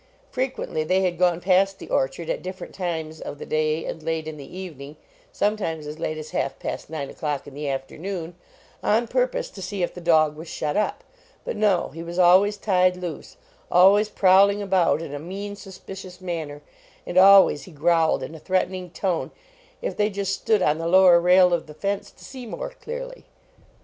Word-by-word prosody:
Frequently 255 -11 -2
they 185 +4 +2
had 175 -2 -1
gone 175 -2 +3
past 190 +2 +2
the - - -10
orchard 135 +5 -1
at - - -2
different 185 0 -8
times 160 -4 -4
of - - -6
the - - -8
day 155 +1 0
and 160 - -5
late 160 0 -3
in 155 - -5
the 145 +5 -10
evening 150 -6 -8 0.4
sometimes 200 - -1
as 150 +2 -7
late 155 -1 -3
as 155 0 -8
half 140 - -2
past - - -5
nine 155 -3 -4
o - - -12
clock 150 -3 -3
in 145 - -11
the 145 +1 -4
afternoon 165 +6 -5 0.5
on 230 +3 +2
purpose - - -1
to 190 - -10
see 190 0 -3
if - - -2
the 180 - -9
dog 155 -3 +3
was 160 +2 -9
shut 150 -1 -3
up. 210 - -1 0.4
But - - -3
no; 205 -4 +2
he 165 - -9
was 170 +1 -7
always 185 +3 +5
tied 185 -3 +2
loose; 180 - -7 0.3
always 200 +4 +5
prowling 200 +1 +5
about 190 -5 +2
in 145 - -7
a 145 - -4
mean, 200 +6 -6
suspicious 190 -2 -10
manner, 160 -5 -5 0.4
and 175 - -6
always 190 -5 +7
he 185 - -13
growled 160 -2 +2
in 130 - -7
a 160 - -9
threatening 185 +1 -1
tone 175 +1 -2 0.5
if - - -2
they 210 0 +1
just 195 -1 -2
stood 210 0 +1
on 150 +1 +2
the 165 - -2
lower 180 -1 +7
rail 180 +1 +5
of 170 -2 -1
the 150 - -11
fence 200 +4 -3
to - - -17
see 260 -3 -9
more - - -5
clearly. - - -8
180 Hz, 195 wpm, -24 LUFS, 160-195 Hz, 0.5 s, always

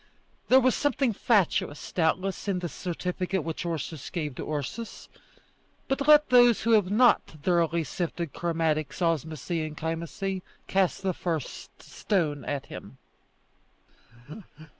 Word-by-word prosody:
There 260 - +7
was 255 0 +3
something 270 -4 +1
fatuous, 190 -9 +1
doubtless, 185 +4 0
in 195 -2 +1
this 175 -3 -5
certificate 180 0 -3
which 165 +2 -4
Ursus 160 -3 -4
gave 155 -6 -3
to 140 - -6
Ursus; 155 - -5 0.8
but 275 +1 -1
let 300 0 +7
those 245 -2 +6
who 230 - +2
have 210 -5 +4
not 240 +4 +5
thoroughly 165 +1 0
sifted 170 -1 -4
chromatics, 160 -3 -1
osmosy, 160 -1 -1
and 155 -1 -6
chymosy 170 +4 -3 0.2
cast 190 0 +1
the 190 -1 0
first 165 -6 -5
stone 155 - -1
at 140 -2 -3
him. - - -10
175 Hz, 125 wpm, -27 LUFS, 160-200 Hz, 0.8 s, There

